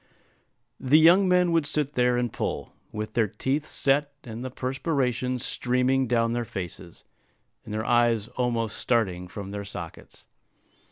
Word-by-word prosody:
The 135 +3 +4
young 175 +4 +6
men 180 -1 +4
would 165 -3 +2
sit 145 -1 -1
there 125 0 +2
and 120 -2 -1
pull, - - -4 0.2
with 105 0 -5
their 115 -3 +2
teeth 135 +9 -2
set, 145 +1 +1
and 115 0 -7
the 130 - -4
perspiration 130 -1 -1
streaming 125 +2 0
down 115 -1 +1
their 120 0 -1
faces, 90 -5 -8 0.6
and - - -10
their 110 +1 -2
eyes 120 -3 +2
almost 115 -3 -1
starting 95 -7 0
from 100 +2 -7
their 100 0 -4
sockets. 90 -4 -8
125 Hz, 150 wpm, -26 LUFS, 110-135 Hz, 0.6 s, young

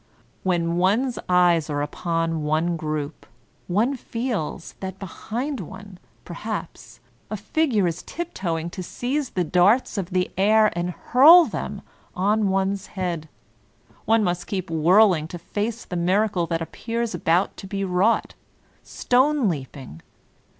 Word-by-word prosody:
When 170 -2 0
one's 225 +8 +1
eyes 175 -3 +3
are 145 -1 -1
upon 165 +1 -2
one 155 +3 0
group, 155 -2 -4 0.4
one 220 +10 +1
feels 230 - -4
that 190 -1 -6
behind 240 - -5
one, 190 +1 -10 0.3
perhaps, 170 - -7 0.3
a 215 - -3
figure 225 - +1
is 170 -1 -2
uptoeing 175 - -4
to 185 - -6
seize 255 +9 -3
the 180 - -1
darts 195 +7 +3
of 185 -2 -4
the 180 -1 0
air 215 0 +4
and 175 +1 -1
hurl 300 - +7
them - - -5 0.3
on 205 +2 +1
one's 195 +1 -1
head; 170 -4 -3 0.8
one 225 0 +3
must 180 -2 -2
keep 185 -3 -4
whirling 170 +1 +4
to 175 - -7
face 215 +6 -4
the 180 - -6
miracle 185 +1 +1
that 165 -1 -1
appears 230 +6 -4
about 175 +2 +1
to 195 - -8
be 195 0 -3
wrought 190 +5 +1 0.3
— - - -36
stone 260 0 +2
leap 145 -5 -4
ing! 120 - -11
185 Hz, 140 wpm, -23 LUFS, 170-220 Hz, 0.8 s, hurl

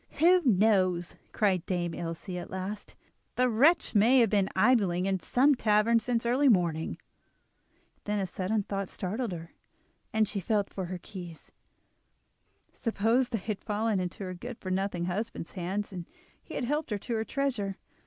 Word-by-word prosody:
"Who 360 +3 +5
knows?" 190 - +2 0.2
cried 190 -5 +1
Dame 175 -2 -1
Ilse 165 +2 -6
at 180 -1 -5
last, 190 +3 -6 0.4
"the 250 0 +3
wretch 280 +9 +3
may 230 +5 +5
have 225 - +3
been 200 -2 +2
idling 190 -4 +3
in 195 -1 0
some 270 +10 +3
tavern 225 -1 +3
since 235 0 -1
early 260 +4 +3
morning." 170 -6 +1 1.1
Then 210 0 -1
a 195 - 0
sudden 190 +4 -1
thought 195 -1 -3
startled 215 +5 -3
her, 165 -1 -7 0.6
and 220 -1 +2
she 200 - -3
felt 205 0 -1
for 190 - -3
her 180 +1 -5
keys. 175 -3 -10 1.2
Suppose 230 +2 +1
they 230 - -1
had 210 0 -5
fallen 215 -1 0
into 180 +2 -4
her 185 -1 -4
good 235 +6 -7
for 185 - -6
nothing 185 -2 -1
husband's 190 -1 -4
hands 195 +3 -3
and 175 -2 -6 0.3
he - - -10
had - - -2
helped 295 +5 -1
himself 210 -3 -4
to 240 - -2
her 220 - 0
treasure! 230 -7 -2
205 Hz, 165 wpm, -29 LUFS, 185-230 Hz, 1.2 s, Who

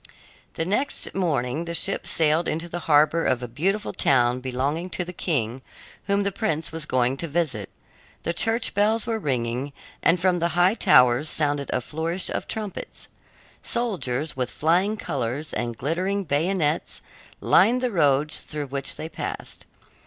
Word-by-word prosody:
The 165 - -1
next 210 +10 -1
morning 150 -4 -1
the 170 0 -3
ship 195 - -1
sailed 160 +1 +4
into 165 +2 -2
the 175 +1 -5
harbor 155 +2 +4
of 125 -1 +1
a - - -3
beautiful 185 - -1
town 125 -1 +3
belonging 135 +7 -2
to 180 - -3
the 180 - -8
king 130 - -2 0.5
whom 200 0 +2
the 200 - 0
prince 180 -6 -1
was 160 -1 -4
going 130 +1 +1
to 170 - -4
visit. 145 - -2 0.5
The 170 - -1
church 225 +6 +2
bells 215 +2 +2
were 225 -1 -1
ringing, 130 - -2 0.3
and 170 +2 +3
from 180 0 +2
the 170 - +2
high 180 +3 +5
towers 125 - +5
sounded 145 -2 0
a 125 - 0
flourish 165 +7 -3
of - - -3
trumpets. 215 -3 -6 0.5
Soldiers, 160 - -1
with 125 -2 -2
flying 180 +7 +1
colors 140 - -3
and 120 -1 -3
glittering 185 +8 -1
bayonets, 160 0 0 0.4
lined 250 +2 +4
the 250 -1 0
roads 150 -4 +2
through 150 -2 -6
which 135 0 -2
they 160 - -5
passed. 160 - -6
160 Hz, 160 wpm, -24 LUFS, 135-185 Hz, 0.5 s, high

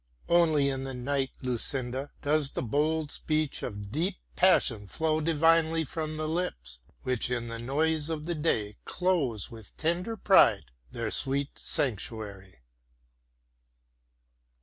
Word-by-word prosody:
Only 160 -5 +4
in 135 -1 -2
the 135 -1 -5
night, 135 +1 -1
Lucinda, 130 +2 -2
does 150 -1 +3
the - - -2
bold 150 +5 0
speech 155 -2 -1
of 100 -3 -6
deep 175 - 0 0.2
passion 125 - +4
flow 160 +6 0
divinely 165 +1 +3
from 155 +1 -4
the 155 0 -2
lips, 65 - -3 0.2
which 125 -2 0
in 120 -1 -2
the 115 0 -5
noise 150 +5 0
of 155 -2 -3
the 175 - -1
day 110 -10 -1
close 150 - 0
with 110 -4 -11
tender 180 +8 -1
pride - - +5 0.3
their 115 -2 -3
sweet 140 +1 +2
sanctuary." 100 - -3
145 Hz, 125 wpm, -29 LUFS, 120-160 Hz, 0.3 s, pride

